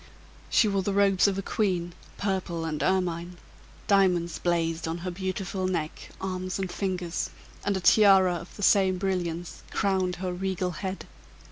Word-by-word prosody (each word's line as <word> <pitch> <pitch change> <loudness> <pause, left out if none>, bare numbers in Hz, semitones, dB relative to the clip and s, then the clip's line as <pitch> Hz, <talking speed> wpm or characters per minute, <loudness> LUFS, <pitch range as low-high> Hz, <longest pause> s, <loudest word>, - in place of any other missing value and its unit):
She 220 - +4
wore 200 -1 +1
the 195 +1 -1
robes 200 -1 +4
of 195 -1 0
a 195 - -2
queen, 180 -5 -1 0.2
purple 185 -4 -2
and 155 -2 -3
ermine 180 -2 0 0.5
diamonds 180 -5 +2
blazed 165 -1 0
on 165 +1 -3
the 180 - -2
beautiful 185 +1 -3
neck, 165 -4 -3
arms, 185 -1 -3
and 190 -2 -3
fingers, 180 -3 -2 0.3
and 200 -1 0
a - - -4
tiara 190 -2 +6
of 170 0 -7
the 205 - -6
same 190 -2 +4
brilliants 175 -3 -3
crowned 190 -3 0
her 180 0 -3
regal 185 0 -2
head. 190 +3 -5
185 Hz, 155 wpm, -27 LUFS, 175-195 Hz, 0.5 s, tiara